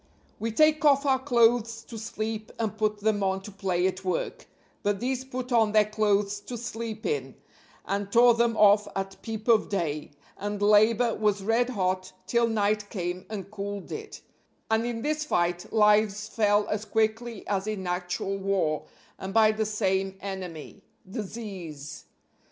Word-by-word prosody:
We 225 +1 -2
take 310 +6 +4
off 285 -1 +5
our 265 -2 +3
clothes 235 -3 +2
to 230 -1 -9
sleep 215 0 -4
and 220 -2 -2
put 215 -1 -1
them 210 -1 +1
on 190 0 0
to 210 - -8
play 190 -3 -1
at 190 0 -1
work, 185 -1 -3 0.3
but 205 -1 0
these 255 +2 -1
put 255 -1 -6
on 225 -3 +3
their 215 -1 +5
clothes 205 -1 +1
to 240 +4 -7
sleep 225 -1 -5
in, 445 0 -2 0.5
and 200 0 -2
tore 240 +2 +7
them 230 -1 +1
off 210 0 +6
at 195 0 -4
peep 220 -1 -6
of 230 -2 +4
day, 160 -7 -2 0.3
and 205 0 -3
labor 215 +3 +4
was 205 -2 0
red 230 +4 +2
hot 185 -4 -1
till 235 +4 +2
night 210 -1 0
came 180 -1 -4
and 200 -2 -6
cooled 200 -1 -5
it; 435 -1 -7 0.5
and 220 +1 +2
in 230 -1 -4
this 305 0 0
fight 175 -9 -1
lives 210 -1 +3
fell 210 -1 +2
as 210 0 -1
quickly 220 +1 -1
as 200 0 -1
in 210 -3 -3
actual 180 +2 -2
war, 190 -6 0 0.3
and 195 +2 -6
by 220 -1 +6
the 215 0 -1
same 195 -2 0
enemy 190 -2 -7 0.3
Disease. 190 - -7
210 Hz, 165 wpm, -27 LUFS, 195-230 Hz, 0.5 s, tore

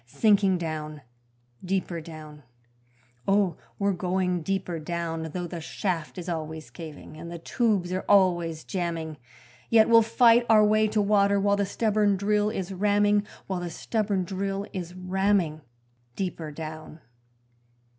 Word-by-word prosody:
Sinking 200 - +3
down, 155 -3 -5 0.6
deeper 180 -2 -2
down, 155 -2 -11 0.9
Oh, 195 -4 +3 0.2
we're 200 0 +1
going 180 0 -1
deeper 190 -1 -2
down 165 0 -3
Though 180 +2 -3
the 170 0 -6
shaft 170 0 -3
is 180 0 -6
always 160 -4 -5
caving, 155 0 -10
and 170 +2 -8
the 170 - -5
tubes 195 -1 0
are 185 - -2
always 175 -5 +3
jamming, 165 -4 -3 0.5
Yet 225 -1 +6
we'll 230 0 +8
fight 230 +1 +5
our 215 -1 +7
way 215 +1 +3
to 215 0 +1
water 200 -1 +3
while 200 +1 +3
the 200 -1 0
stubborn 210 -1 +1
drill 210 +1 +1
is 195 -3 -4
ramming 205 +1 +2 0.2
While 190 -2 -3
the 175 -1 -4
stubborn 200 +2 -1
drill 195 +2 -3
is 180 -2 -5
ramming 185 -3 0 0.5
deeper 175 -4 -4
down. 155 +1 -8
185 Hz, 140 wpm, -26 LUFS, 165-205 Hz, 0.9 s, we'll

